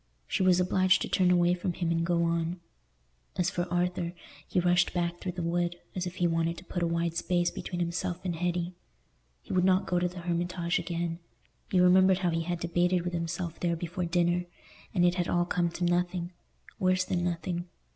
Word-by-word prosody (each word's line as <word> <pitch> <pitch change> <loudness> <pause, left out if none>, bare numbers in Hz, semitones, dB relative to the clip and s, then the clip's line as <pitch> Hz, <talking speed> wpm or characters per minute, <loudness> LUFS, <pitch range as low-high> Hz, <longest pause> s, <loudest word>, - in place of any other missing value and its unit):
She - - -1
was 185 -1 +5
obliged 185 0 +3
to - - -3
turn 185 -2 +3
away 175 0 +4
from 180 0 -2
him 170 -1 -1
and 165 0 +1
go 170 0 +1
on. 170 +1 0 0.8
As 180 0 +1
for 175 0 -3
Arthur, 175 -1 0 0.3
he - - +1
rushed 180 +1 +2
back 175 0 -1
through 180 - -3
the 175 -1 -4
wood, 175 +1 0 0.2
as 185 -1 -2
if 175 - -7
he 175 - +1
wanted 165 0 +1
to 185 - -11
put 175 - -3
a 170 - +2
wide 170 0 -1
space 175 0 +1
between 175 - -5
himself 170 0 -2
and 175 -2 -1
Hetty. 175 +1 -1 0.7
He - - -6
would 180 - +3
not 185 0 +3
go 180 - +1
to 180 - +1
the 180 0 -8
Hermitage 175 0 -1
again; 170 -1 -3 0.5
he 185 - +2
remembered 185 +1 +6
how 180 -2 0
he 165 0 0
had 175 +1 -3
debated 175 +1 +1
with 175 0 -3
himself 170 0 -3
there 170 -1 0
before 175 +2 -3
dinner, 175 +1 +1 0.5
and 175 -2 +3
it 175 - +4
had 175 -1 -1
all 175 0 +2
come 175 -1 0
to 170 +1 -5
nothing—worse 180 +1 -1
than 175 -1 -1
nothing. 175 0 -2
175 Hz, 205 wpm, -29 LUFS, 170-180 Hz, 0.8 s, remembered